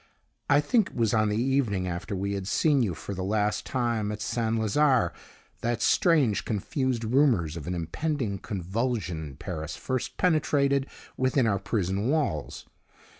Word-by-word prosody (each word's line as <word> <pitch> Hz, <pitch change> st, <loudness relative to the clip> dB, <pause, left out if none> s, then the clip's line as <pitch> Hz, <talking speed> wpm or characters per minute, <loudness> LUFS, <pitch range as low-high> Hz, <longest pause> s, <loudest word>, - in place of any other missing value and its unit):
"I 145 Hz, 0 st, +5 dB
think 220 Hz, -, +2 dB
it -, -, -17 dB
was 115 Hz, -2 st, +1 dB
on 110 Hz, -1 st, +3 dB
the 105 Hz, -, 0 dB
evening 120 Hz, -7 st, +1 dB
after 90 Hz, +4 st, -4 dB
we 100 Hz, +1 st, -2 dB
had 95 Hz, -1 st, -4 dB
seen 145 Hz, +4 st, +3 dB
you 100 Hz, -8 st, 0 dB
for 100 Hz, -, -6 dB
the 95 Hz, -1 st, -4 dB
last 105 Hz, +1 st, 0 dB
time 115 Hz, -5 st, -1 dB
at 105 Hz, -, -5 dB
St. 115 Hz, +1 st, -1 dB
Lazare 130 Hz, +4 st, +3 dB, 0.5 s
that 120 Hz, -1 st, -1 dB
strange, 155 Hz, -, +3 dB
confused 120 Hz, +3 st, -1 dB
rumors 115 Hz, -, +2 dB
of 75 Hz, -4 st, -7 dB
an 90 Hz, -, -2 dB
impending 100 Hz, -, -2 dB
convulsion 100 Hz, -2 st, -2 dB
in 70 Hz, -3 st, -8 dB
Paris 80 Hz, -1 st, -5 dB
first 130 Hz, -2 st, -3 dB
penetrated 140 Hz, -5 st, +2 dB, 0.3 s
within 130 Hz, 0 st, +2 dB
our 100 Hz, -3 st, +1 dB
prison 100 Hz, +2 st, -1 dB
walls. 140 Hz, -, -1 dB
110 Hz, 160 wpm, -27 LUFS, 95-130 Hz, 0.5 s, I